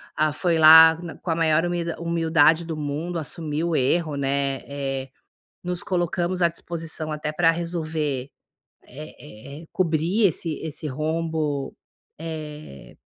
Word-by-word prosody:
a 155 0 +2
foi 165 +1 0
lá 160 +1 +9 0.3
com 170 - -2
a - - +1
maior 160 -1 +2 0.4
humildade 165 -1 +3
do 165 -1 -5
mundo, 155 +4 -3
assumiu 160 +1 -3
o 165 - 0
erro, 155 +3 +1
né, 140 -1 -1
eh, 135 -1 -4 0.5
nos 180 0 -1
colocamos 175 0 -1
à 170 - +5
disposição 165 -2 -6
até 150 0 -3
para 165 +1 +3
resolver, 155 -5 -3 0.5
é 140 -2 -11
é - - -12
é, - - -14
cobrir 175 +5 +1
esse 165 -2 -2
esse 155 -1 -5
rombo, 155 -1 -2 0.4
eh, 155 - -8
160 Hz, 135 wpm, -24 LUFS, 150-170 Hz, 0.5 s, lá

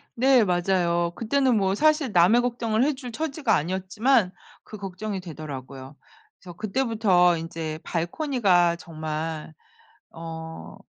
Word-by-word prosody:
네. 255 -1 +5
맞아요. 175 -2 +1
그때는 255 +1 +1
뭐 195 -1 +1
사실 305 0 +2
남의 185 +7 +5
걱정을 235 -2 0
해줄 265 -3 -2
처지가 285 -3 -1
아니었지만 190 - +1 0.3
그 215 - -10
걱정이 195 +1 -5
되더라고요. 140 -5 -9 0.4
그래서 180 -1 -11
그때부터 210 -5 +2
인제 160 -1 -5
발코니가 175 - +1
정말 155 -1 -5 0.6
어 160 0 -8
190 Hz, 275 characters per minute, -25 LUFS, 165-235 Hz, 0.6 s, 네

